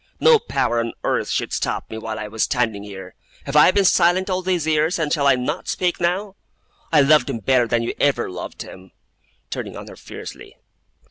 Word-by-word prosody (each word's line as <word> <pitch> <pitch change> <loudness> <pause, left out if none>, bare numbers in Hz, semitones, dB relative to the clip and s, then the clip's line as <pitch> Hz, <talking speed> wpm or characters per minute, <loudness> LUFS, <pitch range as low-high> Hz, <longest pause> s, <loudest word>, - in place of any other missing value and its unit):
No 470 -2 +6
power 120 - -1
on 115 0 -2
earth - - 0
should - - -2
stop - - -2
me, 110 - -5
while 110 -1 -5
I 105 - -5
was 110 +1 -5
standing 115 -5 0
here! 95 -3 -9 0.3
Have 140 - -5
I 150 - +7
been 195 +1 +2
silent 185 +2 +3
all 185 0 0
these 180 -3 -1
years, 155 +2 +1
and 155 -3 -1
shall 140 -3 +2
I 140 - +6
not 140 +7 -3
speak 180 -1 -1
now? 190 +3 -1 0.5
I 155 -3 +6
loved 140 -2 +4
him - - -2
better 120 +2 +2
than 115 0 0
you 115 - -2
ever 140 -4 +1
loved 90 -1 -7
him!' 95 0 -14 0.6
turning - - -5
on - - -9
her - - -11
fiercely. - - -10
140 Hz, 205 wpm, -21 LUFS, 115-175 Hz, 0.6 s, I